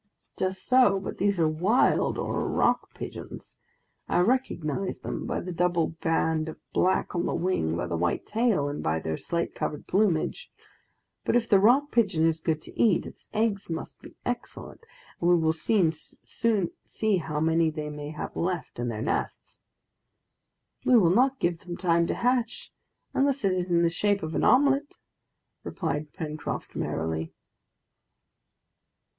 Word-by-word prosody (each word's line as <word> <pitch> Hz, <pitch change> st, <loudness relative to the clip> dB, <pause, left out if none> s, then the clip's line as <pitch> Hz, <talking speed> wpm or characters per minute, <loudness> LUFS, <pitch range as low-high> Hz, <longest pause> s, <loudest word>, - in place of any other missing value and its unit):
"Just 185 Hz, 0 st, -2 dB
so, 250 Hz, -6 st, +5 dB
but 190 Hz, -, -6 dB
these 200 Hz, -2 st, +1 dB
are 160 Hz, -, +4 dB
wild 180 Hz, +10 st, +2 dB
or -, -, -2 dB
rock -, -, +1 dB
pigeons. -, -, -8 dB, 0.5 s
I -, -, +3 dB
recognize 195 Hz, -, 0 dB
them -, -, -4 dB
by -, -, -2 dB
the 180 Hz, -, -5 dB
double 175 Hz, -1 st, +1 dB
band 160 Hz, -1 st, +1 dB
of -, -, -8 dB, 0.2 s
black 185 Hz, +1 st, +1 dB
on 170 Hz, -, 0 dB
the -, -, -1 dB
wing, 85 Hz, -, 0 dB
by -, -, -2 dB
the 85 Hz, -, -3 dB
white 85 Hz, +1 st, -1 dB
tail, 215 Hz, -9 st, +1 dB
and 145 Hz, +1 st, -4 dB
by 80 Hz, +1 st, 0 dB
their 80 Hz, 0 st, -3 dB
slate 170 Hz, -, -3 dB
colored 150 Hz, -, -4 dB
plumage. 185 Hz, -5 st, 0 dB, 0.7 s
But -, -, +1 dB
if 235 Hz, -1 st, +2 dB
the 200 Hz, -, +5 dB
rock 260 Hz, +8 st, +4 dB
pigeon 195 Hz, -9 st, +2 dB
is 165 Hz, -1 st, +1 dB
good 155 Hz, -1 st, -1 dB
to -, -, -12 dB
eat, 215 Hz, -7 st, +3 dB
its -, -, -13 dB
eggs 210 Hz, -3 st, 0 dB
must 165 Hz, -, -6 dB
be -, -, -13 dB
excellent, 245 Hz, -, -5 dB, 0.4 s
and 175 Hz, -, +2 dB
we 175 Hz, -, +6 dB
will 160 Hz, -1 st, +2 dB
soon 170 Hz, 0 st, +2 dB
see 210 Hz, +3 st, -2 dB
how 155 Hz, -3 st, -3 dB
many 160 Hz, +1 st, +3 dB
they 150 Hz, -1 st, -5 dB
may 150 Hz, 0 st, -6 dB
have 150 Hz, -, -6 dB
left 175 Hz, -7 st, -3 dB
in 120 Hz, -, -1 dB
their 110 Hz, -2 st, -3 dB
nests!" -, -, -3 dB, 1.2 s
"We 250 Hz, -, +5 dB
will 175 Hz, -5 st, +5 dB
not 260 Hz, +5 st, +3 dB
give 170 Hz, -1 st, 0 dB
them 175 Hz, 0 st, -7 dB
time 170 Hz, -2 st, +2 dB
to -, -, -1 dB
hatch, 245 Hz, -1 st, -1 dB, 0.4 s
unless 275 Hz, -3 st, +1 dB
it 190 Hz, -, +3 dB
is 180 Hz, 0 st, -2 dB
in 170 Hz, -1 st, +3 dB
the 170 Hz, -, +4 dB
shape 200 Hz, +2 st, 0 dB
of 160 Hz, +1 st, -4 dB
an -, -, 0 dB
omelet!" 280 Hz, +2 st, +3 dB, 0.7 s
replied 150 Hz, 0 st, -3 dB
Pencroft 155 Hz, -1 st, -5 dB
merrily. 80 Hz, 0 st, -3 dB
175 Hz, 160 wpm, -27 LUFS, 155-215 Hz, 1.2 s, we